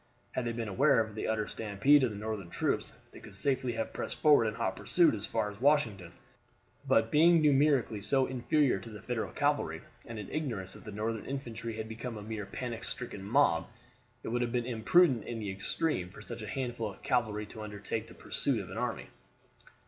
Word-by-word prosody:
Had 125 - -2
they 115 - 0
been 115 -1 -3
aware 125 +6 +4
of 110 -1 -1
the 110 - -3
utter 110 -1 0
stampede 115 +7 +3
of 125 - +3
the 105 - -7
Northern 105 -4 -4
troops, - - -1
they - - -12
could - - -12
safely 130 -3 0
have 115 0 -3
pressed - - -4
forward 145 -7 +6
in 105 - -2
hot 105 -5 -1
pursuit 170 - +3
as 105 - -3
far 110 -2 -1
as 105 +2 -14
Washington, 115 - +2 0.8
but 130 -4 +3
being 165 +3 +6
numerically 140 -7 +3
so 135 +5 +2
inferior 130 -1 +2
to 115 - -10
the 105 -1 -10
Federal 120 -3 -2
cavalry, - - 0 0.3
and 115 - -6
in 105 -2 -6
ignorance 115 -12 -3
that - - -13
the 105 - -6
Northern 110 +2 -3
infantry 115 -4 -4
had 110 0 -4
become 115 +1 -6
a 105 - -7
mere 105 -2 -5
panic 120 -3 -5
stricken 120 -7 -5
mob, 100 - +3 0.6
it - - -4
would 120 +2 0
have 120 -1 0
been 120 -1 0
imprudent 125 +3 +4
in 120 - -4
the 105 -3 -3
extreme 100 - -1
for - - -12
such - - -7
a - - -6
handful 120 -4 -2
of 95 - -16
cavalry 110 -4 0
to 110 +1 -10
undertake 105 +1 -4
the - - -13
pursuit 135 -5 -1
of 95 -2 -7
an 95 - -6
army. 125 -1 -2
115 Hz, 210 wpm, -31 LUFS, 105-130 Hz, 0.8 s, forward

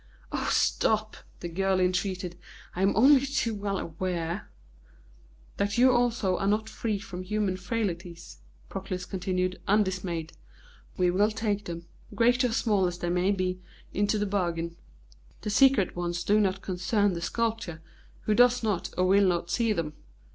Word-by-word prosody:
"Oh, - - -1
stop!" 215 0 +1 0.3
the 175 - -3
girl 190 +2 0
entreated. 185 -1 -1 0.4
"I 180 - -2
am 195 +1 +3
only 265 +5 +6
too 265 -5 -1
well 200 -1 -2
aware 170 +1 -3 0.5
" - - -28
"That 200 +2 0
you 255 +2 +6
also 240 -6 +1
are 195 - 0
not 215 +2 +1
free 220 -1 -2
from 195 -3 -7
human 200 0 -1
frailties," 180 -3 -4 0.3
Proclus 185 -2 -5
continued, 185 0 -2
undismayed. 185 -5 0 0.6
"We 180 -1 +3
will 205 +4 +3
take 210 -2 -2
them, 170 -1 -6 0.3
great 245 +2 +3
or 250 - +2
small 210 -5 +2
as 175 0 -4
they 175 0 -2
may 180 +2 +2
be, 185 -2 -1 0.3
into 205 +2 +1
the 210 - 0
bargain. 170 -4 -1 0.7
The 210 - -3
secret 250 -4 +4
ones 175 0 -2
do 210 +3 +3
not 195 -2 0
concern 200 +2 +1
the 170 - -4
sculptor, 220 -3 -2 0.4
who 215 - +1
does 245 +2 +4
not 210 -5 -1
or 185 - +3
will 195 +1 +5
not 170 -1 0
see 230 +1 +1
them. 165 -7 -2
195 Hz, 160 wpm, -28 LUFS, 180-215 Hz, 0.7 s, only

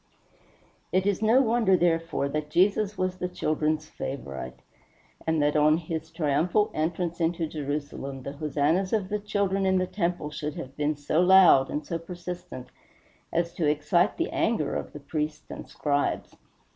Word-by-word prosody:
It 185 0 +2
is 205 0 +1
no 230 +5 +5
wonder, 225 -5 +3
therefore, 165 -4 +1
that 150 +1 -3
Jesus 200 +5 +2
was 185 0 -1
the 180 - -1
children's 155 -2 -1
favorite, 65 - -6 0.6
and 160 -1 +2
that 145 +1 +1
on 155 +1 +5
his 160 -1 -4
last 160 - -24
triumphal 170 +7 +1
entrance 170 +2 -2
into 165 0 +1
Jerusalem 145 -3 -5
the 140 - -5
hosannas 155 +6 0
of 200 -4 0
the 210 0 -1
children 200 -1 0
in 190 0 +3
the 185 - +1
temple 175 -5 -2
should 150 0 -4
have 135 +1 -7
been 150 +1 0
so 145 +3 0
loud 180 -7 +7
and 150 0 -3
so 165 +1 -3
persistent 175 -6 -8 0.6
as 170 0 0
to 165 -3 0
excite 150 +5 +2
the 335 - -1
anger 220 -11 0
of - - -4
the 150 - -9
priests 150 +1 -4
and - - -8
Scribes. 145 -1 -1
165 Hz, 165 wpm, -27 LUFS, 150-185 Hz, 0.6 s, loud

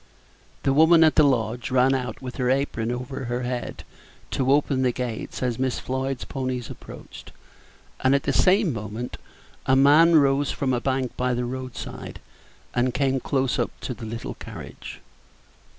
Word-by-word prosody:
The 135 - +2
woman 160 +3 +6
at 155 - +5
the 155 - +5
lodge 120 -3 +1
ran 130 +1 +4
out 125 -1 -3
with 125 -1 -6
her 125 -1 +1
apron 130 -4 0
over 125 +2 -5
her 120 +1 -2
head 125 0 -4 0.5
to 130 0 +1
open 140 -2 +2
the 130 -1 +3
gates 120 0 -4
as 125 -2 -1
Miss 130 -1 0
Floyd's 130 0 -3
ponies 130 -3 -4
approached, - - -11 0.7
and 130 +1 +3
at 140 - 0
the 140 - 0
same 185 - +4
moment 110 +3 -5 0.5
a 130 - +5
man 150 +5 +6
rose 140 -1 +4
from 135 -2 -1
a 120 - 0
bank 130 -1 -1
by 125 0 0
the 125 0 -1
road 130 0 -5
side, - - -7 0.5
and 125 0 +1
came 135 -1 +1
close 130 0 0
up - - +1
to 125 - -3
the 115 -2 -8
little 115 +1 -5
carriage. - - -9
130 Hz, 170 wpm, -24 LUFS, 125-135 Hz, 0.7 s, woman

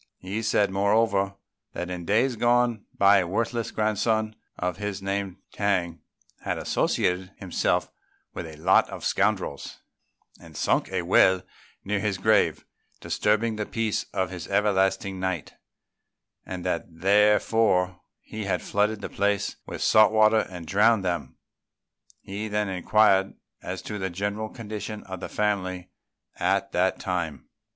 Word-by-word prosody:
He 100 +4 -4
said, 105 -3 +2
moreover, 100 0 +2 0.4
that 90 +1 -4
in 90 -1 -5
days 115 +7 +2
gone 120 -1 +2
by 100 0 +6
a 90 - -1
worthless 115 +4 -1
grandson 110 0 0 0.2
of 90 0 -2
his 105 -2 -4
named 95 -1 -3 0.2
T'ang, 90 -5 0 0.4
had - - -3
associated 90 +1 0
himself 95 -3 -1 0.4
with - - -6
a 80 - -10
lot 85 +5 +3
of - - -7
scoundrels 100 -8 -1 0.6
and - - -13
sunk - - +1
a 95 -2 -1
well 95 +1 +4 0.4
near 100 +1 0
his 100 -2 -1
grave, 110 +3 +2 0.3
disturbing 110 +1 0
the 105 - -2
peace 115 -2 -1
of 95 -1 -1
his 90 -2 -7
everlasting 95 -1 +1
night; 95 -4 -3 0.9
and 90 -2 -6
that - - -1
therefore 95 0 +2 0.2
he 110 -1 -7
had 95 -2 -1
flooded 105 +1 0
the - - -4
place 100 0 0
with - - -4
salt 110 -1 +6
water 110 0 +4
and 90 -3 -8
drowned 100 +4 +3
them. 90 -1 -3 0.8
He 100 +3 -5
then 105 -1 -1
inquired 95 +1 +3 0.3
as - - -6
to 105 - -5
the 95 0 -2
general 100 +4 -3
condition 105 -1 -6
of 95 -1 -7
the - - -6
family 95 -4 -2 0.5
at - - +1
that - - +1
time. 85 -4 -3
100 Hz, 140 wpm, -26 LUFS, 95-110 Hz, 0.9 s, by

